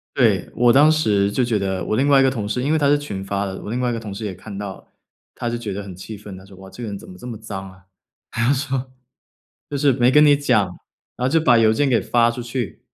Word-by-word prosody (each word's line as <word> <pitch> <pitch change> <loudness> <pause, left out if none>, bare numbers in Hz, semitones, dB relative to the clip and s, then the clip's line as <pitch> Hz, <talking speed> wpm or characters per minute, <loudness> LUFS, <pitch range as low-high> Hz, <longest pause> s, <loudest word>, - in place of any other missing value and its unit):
对， - - +2
我 120 0 +4
当 150 +4 +6
时 105 -10 +2
就 130 - +1
觉 120 -3 +1
得 95 -1 -2
我 110 - -1
另 135 - +2
外 140 -1 +5
一 - - +5
个 135 - +4
同 110 -6 -4
事 110 +4 -2
因 140 - -1
为 160 - +3
他 145 - +1
是 145 +1 +4
群 100 -10 -6
发 100 +1 -2
的， 95 -1 -6
我 - - -7
另 120 +2 -2
外 125 - 0
一 - - -1
个 115 - -4
同 105 -3 -7
事 105 +2 -5
也 95 - -4
看 100 +3 -10
到 100 -1 -5
了， - - -19 0.5
他 120 - -4
就 120 - -2
觉 115 -4 -5
得 100 +2 -4
很 95 -3 -9
气 105 +3 -8
愤， 105 -2 -10
他 95 - -13
说： 100 0 -15
“哇， 95 0 -12
这 120 - -10
个 115 - -4
人 100 - -5
怎 - - -14
么 90 - -11
这 90 - -11
么 115 -3 -6
脏 95 -3 -7
啊。” 95 0 -19 0.5
他 120 +4 +1
说： 135 -2 -2 0.8
“就 145 - -3
是 140 0 +3
没 125 0 +3
跟 150 +3 +6
你 145 -1 +6
讲， 125 -8 +2 0.5
然 125 - -1
后 - - 0
就 165 - +4
把 125 -7 +4
邮 110 -1 +5
件 140 +6 +1
给 125 -4 +2
发 120 -1 +2
出 120 - -6
去， 120 -6 -5
115 Hz, 320 characters per minute, -21 LUFS, 100-130 Hz, 0.8 s, 当